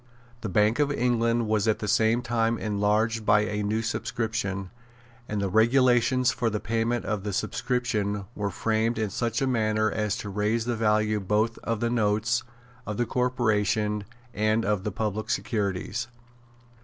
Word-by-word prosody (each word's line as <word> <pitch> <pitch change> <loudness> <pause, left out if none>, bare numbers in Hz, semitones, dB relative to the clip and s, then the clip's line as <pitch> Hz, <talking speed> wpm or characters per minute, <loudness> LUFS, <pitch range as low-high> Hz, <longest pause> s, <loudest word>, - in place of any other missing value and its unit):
The 110 - -3
Bank 105 +6 +2
of 145 -1 +2
England 120 -3 +1
was 110 -1 +1
at 110 - +3
the 105 - -5
same 110 +3 +2
time 115 -1 +1
enlarged 110 +2 0
by 105 0 +4
a 105 -1 -2
new 110 +2 -1
subscription; 110 -4 -2 0.6
and 105 - -1
the 100 - 0
regulations 125 +4 +3
for 115 - 0
the 105 -1 -2
payment 115 +2 -1
of 105 -3 -2
the 105 - -3
subscription 105 -2 -1
were 105 -3 -2
framed 110 +4 0
in 110 -3 -1
such 115 +3 -1
a - - +3
manner 110 -3 +1
as 105 -1 -1
to 105 - -6
raise 105 +3 0
the 120 -1 -1
value 110 -1 +2
both 105 +4 0
of 115 -2 -3
the 120 0 0
notes 110 0 +1 0.5
of 105 -1 -3
the 120 - +1
corporation 110 -4 0 0.3
and 110 +1 +1
of 105 -1 0
the 105 - -1
public 110 +1 -3
securities. 100 +2 -2
110 Hz, 165 wpm, -26 LUFS, 105-115 Hz, 0.6 s, by